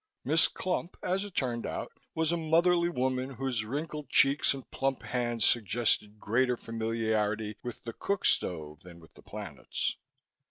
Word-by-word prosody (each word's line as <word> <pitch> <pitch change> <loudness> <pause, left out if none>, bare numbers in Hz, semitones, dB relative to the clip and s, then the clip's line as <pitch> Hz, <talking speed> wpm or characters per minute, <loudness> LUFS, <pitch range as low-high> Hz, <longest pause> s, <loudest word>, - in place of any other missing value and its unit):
Miss 160 +3 +5
Clump, 180 -1 -3
as 190 +2 +1
it 205 -3 -9
turned 120 -3 0
out, - - -4 0.2
was 160 0 +1
a - - +2
motherly 170 +2 +3
woman 130 -3 0
whose 125 -3 -1
wrinkled 150 +4 -4
cheeks 140 +1 +5
and 135 -1 -5
plump 135 0 -1
hands 120 -2 0
suggested 110 -1 +2
greater 125 +3 +2
familiarity 110 -2 -1
with 120 -2 -7
the 115 - -5
cook 200 - -1
stove 75 -3 +1
than 85 -1 -12
with 80 -2 -17
the - - -16
planets. - - -4
125 Hz, 155 wpm, -30 LUFS, 110-155 Hz, 0.2 s, Miss